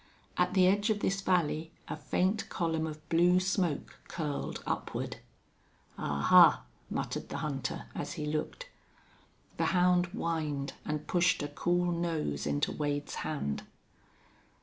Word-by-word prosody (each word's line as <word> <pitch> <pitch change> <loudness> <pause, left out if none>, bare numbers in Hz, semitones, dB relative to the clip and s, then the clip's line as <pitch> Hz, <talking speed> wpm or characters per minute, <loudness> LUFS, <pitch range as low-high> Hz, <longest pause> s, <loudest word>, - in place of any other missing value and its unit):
At - - +1
the 185 -1 +6
edge 205 +4 +3
of 210 -1 +1
this 195 +1 0
valley 165 -4 +1 0.2
a - - -3
faint 185 +8 0
column 160 -2 -1
of 155 0 -8
blue 175 +2 +4
smoke 185 -5 -1
curled 150 -4 -4
upward. - - -3 0.8
"Ahuh!" 70 -1 +6 0.3
muttered - - -3
the - - -4
hunter, 140 -3 -3
as - - -4
he 155 -3 -4
looked. 155 - -3 0.9
The - - +1
hound 180 0 +4
whined 160 -7 -2
and 150 0 -3
pushed 175 -3 +2
a - - -1
cool 175 +4 0
nose 165 - -1
into 70 0 0
Wade's 145 -1 -2
hand. 105 - -2
165 Hz, 130 wpm, -31 LUFS, 150-180 Hz, 0.9 s, the